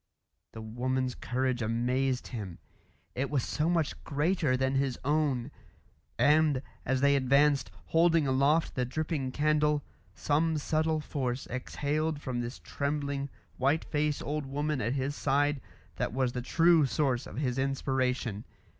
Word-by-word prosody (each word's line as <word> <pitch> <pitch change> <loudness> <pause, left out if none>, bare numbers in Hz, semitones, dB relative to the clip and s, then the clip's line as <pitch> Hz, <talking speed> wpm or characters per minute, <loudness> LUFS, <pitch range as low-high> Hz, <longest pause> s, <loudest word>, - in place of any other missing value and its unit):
The 110 - -7
woman's 125 +3 -1
courage 130 0 -1
amazed 125 +3 0
him; 100 -8 -6 0.6
it 135 +2 -2
was 140 -5 0
so 155 +3 0
much 165 -4 0
greater 150 -2 +1
than 130 +1 0
his 135 -2 0
own; 145 -3 +1 0.7
and, 150 -2 +4 0.2
as 130 +1 +1
they 140 0 +5
advanced, 140 0 +3 0.2
holding 165 -1 +4
aloft 140 +4 +2
the 125 - 0
dripping 140 +1 -2
candle, 150 0 +2 0.3
some 155 +2 +1
subtle 155 +1 0
force 130 -3 -3
exhaled 145 +4 -2
from 130 -4 -3
this 120 +2 -5
trembling, 140 -1 -3 0.3
white 140 +5 +1
faced 150 -1 -1
old 150 -1 -3
woman 145 0 -1
at 115 +3 0
his 140 +1 -2
side 145 0 +1 0.4
that - - -2
was 130 -1 +1
the 125 - -3
true 165 +3 +4
source 130 0 0
of - - -9
his 130 -2 -1
inspiration. 130 -5 -1
140 Hz, 140 wpm, -30 LUFS, 130-150 Hz, 0.7 s, they